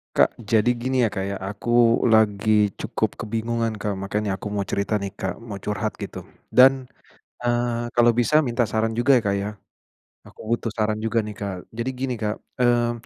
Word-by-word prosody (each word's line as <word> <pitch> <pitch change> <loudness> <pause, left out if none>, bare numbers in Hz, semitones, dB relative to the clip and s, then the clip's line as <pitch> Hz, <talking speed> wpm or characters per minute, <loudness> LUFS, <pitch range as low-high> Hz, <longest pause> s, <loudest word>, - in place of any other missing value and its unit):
Kak, - - +4
jadi 110 0 +2
gini 130 +1 0
ya, 115 - +3
Kak, 95 -2 -3
ya, 100 - -3
aku 115 +4 +2
lagi 105 -1 +3
cukup - - -2
kebingungan 115 +1 -2
Kak 105 -1 -3
makanya 100 0 -2
aku - - -5
mau 100 -1 0
cerita 100 +2 -1
nih 100 -1 -4
Kak 95 -1 -4
mau 105 -4 -7
curhat 105 0 -2
gitu, - - -6 0.3
dan, 130 0 +5 0.6
eee, 120 -1 0
kalau 120 0 +5
bisa 120 +6 +3
minta 120 -4 0
saran 110 +1 0
juga 130 +2 +4
ya, - - -3
Kak, 100 - +2
ya, 105 - -3 0.7
aku - - -16 0.2
butuh 115 - -4
saran 110 -1 -1
juga 115 +1 +1
nih 105 - -6
Kak. 100 -2 -4 0.2
Jadi 115 +3 -2
gini 130 0 -3
Kak, 105 -1 -2 0.2
mmm, 120 -1 +3
115 Hz, 185 wpm, -23 LUFS, 105-120 Hz, 0.7 s, dan